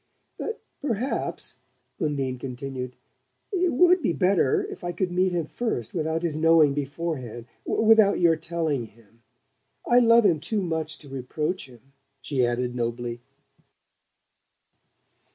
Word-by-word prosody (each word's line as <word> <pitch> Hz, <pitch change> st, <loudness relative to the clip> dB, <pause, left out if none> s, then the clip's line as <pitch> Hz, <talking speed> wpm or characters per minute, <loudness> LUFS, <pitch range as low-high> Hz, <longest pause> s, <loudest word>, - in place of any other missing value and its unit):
"But 450 Hz, -, -4 dB, 0.2 s
perhaps," 255 Hz, -2 st, -2 dB, 0.4 s
Undine 140 Hz, -6 st, -1 dB
continued, 125 Hz, 0 st, -5 dB, 0.6 s
"it 365 Hz, -3 st, +1 dB
would 360 Hz, +6 st, +5 dB
be 230 Hz, -, +1 dB
better 180 Hz, -2 st, +2 dB
if -, -, -9 dB
I 175 Hz, 0 st, -2 dB
could 180 Hz, 0 st, -1 dB
meet 185 Hz, +1 st, +2 dB
him 170 Hz, -3 st, -1 dB
first 155 Hz, -, -3 dB
without 160 Hz, 0 st, -1 dB
his 165 Hz, -3 st, -1 dB
knowing 160 Hz, -2 st, +5 dB
beforehand 140 Hz, -5 st, -4 dB, 0.2 s
without 220 Hz, -2 st, +4 dB
your 170 Hz, -2 st, +5 dB
telling 160 Hz, -5 st, -2 dB
him... 115 Hz, +1 st, -22 dB, 0.7 s
I 245 Hz, -, +6 dB
love 230 Hz, -1 st, +6 dB
him 170 Hz, -6 st, +4 dB
too 205 Hz, +6 st, -2 dB
much 160 Hz, -2 st, -2 dB
to 145 Hz, -, -14 dB
reproach 135 Hz, +5 st, -3 dB
him!" 125 Hz, +2 st, -19 dB, 0.3 s
she 135 Hz, -1 st, 0 dB
added 120 Hz, +1 st, 0 dB
nobly. 120 Hz, 0 st, -3 dB
155 Hz, 130 wpm, -26 LUFS, 130-185 Hz, 0.7 s, I